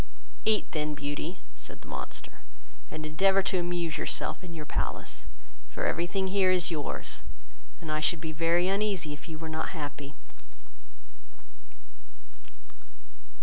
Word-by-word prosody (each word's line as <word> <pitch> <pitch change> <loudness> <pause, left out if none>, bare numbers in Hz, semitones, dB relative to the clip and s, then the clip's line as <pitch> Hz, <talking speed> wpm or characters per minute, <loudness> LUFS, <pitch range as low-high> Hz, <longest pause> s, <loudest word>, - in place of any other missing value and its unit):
"Eat 220 -1 +4
then, 150 -1 0
Beauty, 145 +5 -2 0.2
(said - - -9
the - - -13
monster,) - - -6 0.5
and 155 0 -4
endeavour 195 +5 +5
to 185 -1 +3
amuse 175 -2 0
yourself - - +1
in 180 - -7
your 155 -2 -4
palace; - - -2 0.4
for - - -2
every 170 - +2
thing 190 0 +1
here 190 -1 +5
is 180 -1 +3
yours, 150 -3 -2 0.6
and 160 -2 -4
I 155 - +2
should 160 +2 +4
be 160 0 -3
very 170 +3 +4
uneasy 195 -5 +2
if 150 +3 -9
you 160 - -4
were 160 0 -5
not 160 +2 -2
happy." 145 -1 -5
165 Hz, 140 wpm, -30 LUFS, 155-185 Hz, 0.6 s, endeavour